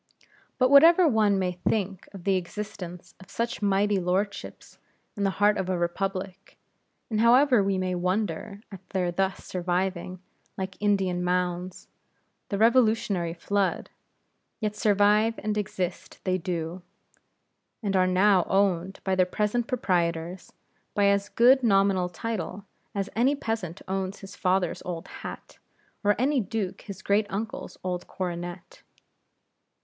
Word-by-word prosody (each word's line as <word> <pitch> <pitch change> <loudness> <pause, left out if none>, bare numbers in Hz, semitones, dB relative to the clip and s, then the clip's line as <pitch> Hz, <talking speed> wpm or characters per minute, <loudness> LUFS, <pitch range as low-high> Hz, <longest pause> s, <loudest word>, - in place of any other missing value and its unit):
But 255 0 +3
whatever 330 +5 +8
one 215 -6 +3
may 185 -1 0
think 190 +1 -2
of 195 -3 -10
the 195 0 +2
existence 180 -1 -6
of 190 - -15
such 230 +3 -3
mighty 200 0 +2
lordships 190 +3 -3 0.4
in 205 - -2
the - - +3
heart 205 +1 +3
of 185 - -2
a 185 - 0
republic, 190 +2 -3 0.5
and 215 - 0
however 245 -1 +5
we 195 -1 0
may 185 0 -1
wonder 185 +1 -2
at 195 - -8
their 180 -2 0
thus 190 +2 -1
surviving, 180 0 -2 0.4
like 190 0 -4
Indian 190 -4 +1
mounds, 180 0 -2 0.6
the 200 - -1
Revolutionary 220 -7 +2
flood; 200 +2 -1 0.7
yet 210 -1 -2
survive 210 +1 +3
and 215 0 -2
exist 195 -4 -4
they 185 -1 0
do, 170 0 -4 1.0
and 200 -2 0
are 185 -1 +4
now 185 0 +4
owned 190 -1 +1
by 190 - 0
their 185 -1 +3
present 210 +5 -1
proprietors, 175 -6 -1 0.4
by 205 - +3
as 200 +1 +1
good 255 +3 +5
nominal 195 -5 +3
title 200 +1 -5 0.3
as 200 -1 -1
any 255 +6 +3
peasant 220 - -4
owns 190 +1 -3
his 195 0 -10
father's 185 -2 0
old 175 0 -5
hat, - - -9 0.4
or 205 0 +3
any 270 +4 +2
duke 205 -3 -3
his 200 0 -9
great 205 +1 +2
uncle's 215 +3 -5
old 180 -1 -3
coronet. 175 -1 -6
195 Hz, 135 wpm, -27 LUFS, 180-210 Hz, 1.0 s, whatever